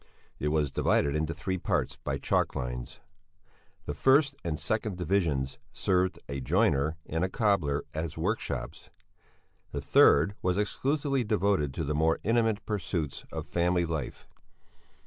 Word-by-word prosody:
It 75 - -1
was 75 -2 +1
divided 70 +2 +2
into 80 +1 0
three 95 +2 -3
parts - - -1
by 70 - -3
chalk 70 - 0
lines. - - -5 0.8
The 75 - -3
first 140 - +4
and 80 -3 -2
second 110 -3 -2
divisions 75 -7 0
served 90 0 +1
a 70 0 -4
joiner 80 - +2
and 80 +2 -2
a 95 - +1
cobbler 95 -10 +1
as 80 0 -4
workshops; 100 +8 -3 0.8
the - - -3
third 80 +8 +5
was 90 0 +1
exclusively 140 +5 0
devoted 100 -8 +1
to 80 - -2
the 75 0 -1
more 80 +2 +2
intimate 115 -1 +1
pursuits 90 -8 -3
of - - -4
family 90 0 +1
life. 80 -5 -5
85 Hz, 140 wpm, -29 LUFS, 75-100 Hz, 0.8 s, third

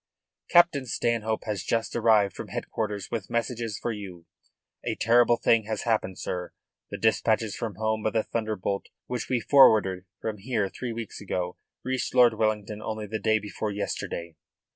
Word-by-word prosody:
"Captain 165 -6 +5
Stanhope 110 -1 0
has 105 -4 -3
just 115 +3 -1
arrived 110 -4 +4
from - - -6
headquarters 105 -3 -4
with 110 -5 -3
messages 115 -2 -2
for 120 - -2
you. 95 -6 -8 0.6
A - - -2
terrible 120 +1 +4
thing 115 -2 +3
has 110 -1 -3
happened, 110 -5 0
sir. 90 -1 -4 0.4
The - - -5
dispatches 110 -1 +1
from 115 -5 -4
home 110 +2 -1
by 110 - +1
the 110 0 0
Thunderbolt 110 -3 -2 0.2
which 125 -1 -4
we 125 - +2
forwarded 105 -8 +5
from 110 -2 -4
here 105 -2 -1
three 125 +3 -5
weeks 115 -2 -6
ago 90 -3 -3 0.3
reached 130 0 -2
Lord 120 -2 +7
Wellington 105 -1 -1
only 110 -1 -4
the 110 +1 -4
day 110 -1 +3
before 105 0 -4
yesterday." 85 -4 -4
110 Hz, 165 wpm, -27 LUFS, 105-115 Hz, 0.6 s, Lord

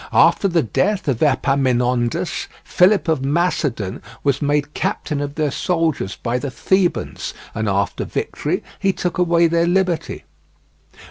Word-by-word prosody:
After 200 - +4
the 170 -3 +2
death 190 - 0
of 130 -5 0
Epaminondas, 125 -4 +1 0.2
Philip 190 +2 +3
of 160 -5 +1
Macedon 140 - -1 0.2
was 140 -1 +1
made 145 0 0
captain 145 -2 -2
of 145 0 -4
their 150 -2 0
soldiers 160 - -1
by 120 +1 -2
the 140 - -4
Thebans, 185 +7 -1 0.2
and 110 -1 -1
after 100 0 0
victory - - -3 0.2
he 195 -1 +1
took 180 -1 -3
away 170 -1 +4
their 170 +1 +2
liberty. 180 -2 0
150 Hz, 135 wpm, -20 LUFS, 125-175 Hz, 0.2 s, After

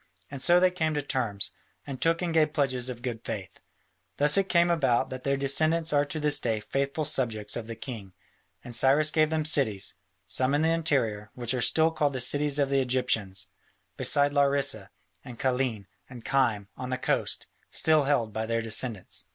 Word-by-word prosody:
And 140 -2 -7
so 175 +4 +5
they 185 0 +3
came 160 -4 -1
to 145 - 0
terms, 120 -8 -1 0.3
and 135 -2 -7
took 165 +2 +1
and 170 -2 -2
gave 155 -2 +2
pledges 130 -4 0
of 120 -1 -8
good 120 -3 -5
faith. 105 -5 -7 0.6
Thus 145 0 +4
it 195 -1 +1
came 175 0 +3
about 130 -6 +1
that 130 -1 -7
their 140 0 0
descendants 155 +4 +2
are 145 0 +3
to 155 +2 -4
this 150 -1 +1
day 110 -3 -1
faithful 140 +6 -2
subjects 115 -8 -2
of 115 -2 -5
the 115 - -6
king, 110 -6 -8 0.5
and 120 - -9
Cyrus 140 +6 +4
gave 155 -1 +2
them 155 -1 -1
cities, 110 -10 +1 0.3
some 130 +2 +1
in 150 - +1
the 160 - +2
interior, 125 -11 0
which 120 -1 -2
are 125 - -1
still 160 +6 +3
called 145 -3 0
the 130 - -3
cities 145 +3 +2
of 140 -2 0
the 135 -1 +3
Egyptians, 110 -8 -1 0.5
beside 145 0 +2
Larissa 140 -8 +1 0.3
and 120 -2 -10
Kyllene 125 -5 -1 0.2
and 125 -3 -12
Kyme 115 -7 +1
on 125 - -6
the 130 - -2
coast, - - -1 0.2
still 155 -2 +3
held 120 -7 0
by 110 +1 -3
their 115 0 -1
descendants. 110 -6 0
135 Hz, 190 wpm, -27 LUFS, 115-150 Hz, 0.6 s, so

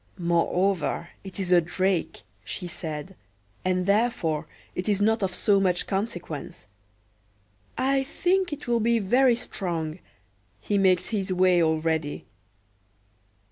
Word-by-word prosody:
"Moreover 175 +1 0
it 195 0 -7
is 185 -2 -2
a 175 -1 +7
drake," 185 - -1 0.2
she 110 - -4
said, 165 +1 -5 0.5
"and 185 0 +1
therefore 200 -7 +1 0.3
it 180 +3 -3
is 200 -2 +2
not 220 +2 +2
of 190 -1 0
so 200 +2 +2
much 180 -2 +1
consequence. 180 - -4 1.1
I 270 +1 +2
think 360 +6 +1
he 295 - -4
will 235 -1 +1
be 230 +1 +3
very 245 +4 +4
strong: 170 -7 -4 0.6
he 200 - 0
makes 185 -2 +3
his 195 -4 -2
way 185 -1 +4
already." 160 -2 0
185 Hz, 125 wpm, -26 LUFS, 170-215 Hz, 1.1 s, a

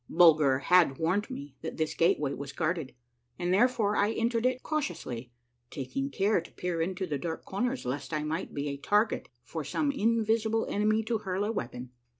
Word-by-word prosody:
Bulger 155 -6 +6
had 155 -1 +4
warned 185 +6 0
me 140 -1 -7
that 160 - -5
this 155 -1 0
gateway 150 -4 +2
was 140 0 -6
guarded, 160 -3 -2 0.4
and 175 +1 0
therefore 210 -1 +3
I 205 +2 +2
entered 230 +1 +1
it 255 0 -2
cautiously, 130 - -3 0.4
taking 135 +1 -3
care 195 +6 +2
to 170 - -14
peer 175 -2 -2
into 185 +3 -1
the 150 -5 -3
dark 165 +2 -4
corners 245 +6 -2
lest 130 +6 -3
I 155 -1 -1
might 160 +4 -3
be 145 0 -3
a 140 - -4
tar 205 +9 +3
get 225 - -6
for 160 +4 -5
some 290 - 0
invisible 225 -2 +1
enemy 215 +2 +2
to 225 0 -1
hurl 190 -1 -2
a 210 - 0
weapon 125 - -5
at. - - -40
180 Hz, 190 wpm, -29 LUFS, 145-220 Hz, 0.4 s, Bulger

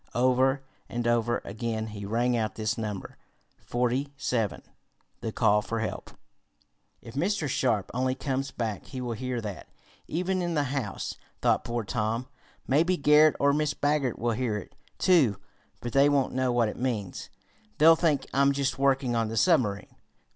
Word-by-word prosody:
Over 130 +2 +3 0.3
and 120 0 -2
over 120 0 +1
again 110 -1 -3
he 105 -2 -7
rang 120 +3 +1
out 110 -4 -1
this 110 0 -1
number 105 -4 -5 0.5
forty 125 +3 0
seven 115 -8 -1 0.6
the - - -4
call 105 0 +3
for 115 +2 -3
help. 110 - -4 0.9
"If 115 -1 -10
Mr. 170 - 0
Sharp 120 -6 0
only 130 +1 0
comes 135 0 -2
back 115 -5 -4
he 130 - -6
will 120 -2 -3
hear 125 +1 -3
that, 105 -4 -7 0.4
even 185 +3 -1
in 175 -1 -1
the 145 - +2
house," 120 -9 -3 0.3
thought - - +3
poor 120 -1 -2
Tom 115 +3 -2 0.4
"Maybe 165 +7 +3
Garret 150 +1 +5
or 140 0 +4
Mrs. 150 0 0
Baggert 145 -4 +1
will 120 +1 0
hear 115 -2 -1
it, 100 - -9 0.2
too, 145 - +4 0.4
but 120 - -5
they 140 +1 +5
won't 140 -2 +1
know 130 -1 +1
what 120 -2 +2
it - - -7
means. 110 -7 -3 0.5
They'll 160 +2 +7
think 155 -4 +1
I'm 140 +1 +4
just 135 -1 -1
working 135 -3 +2
on 115 -1 +1
the 115 +1 -4
submarine." 110 - +2
125 Hz, 165 wpm, -28 LUFS, 115-140 Hz, 0.9 s, They'll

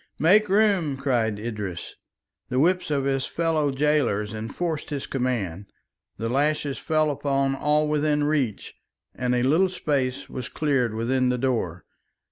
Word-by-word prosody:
"Make 205 +6 +4
room," 195 -8 +2
cried 120 -6 0
Idris. 105 -5 -5 0.6
The 125 - -1
whips 180 +6 +2
of 140 -2 0
his 135 -1 0
fellow 160 -3 0
gaolers 130 -7 +1
enforced 145 +9 -4
his 145 -3 -4
command, 105 -8 -2 0.5
the 115 - -3
lashes 145 +2 0
fell 155 -1 +1
upon 135 -1 0
all 150 +2 +1
within 150 0 +1
reach, 145 -8 -1 0.4
and 125 0 -1
a 125 - +1
little 160 +8 +3
space 140 -6 -2
was 125 -2 -6
cleared 135 -7 0
within 125 +3 +1
the 125 - +1
door. 115 -10 -2
135 Hz, 140 wpm, -25 LUFS, 120-150 Hz, 0.6 s, Make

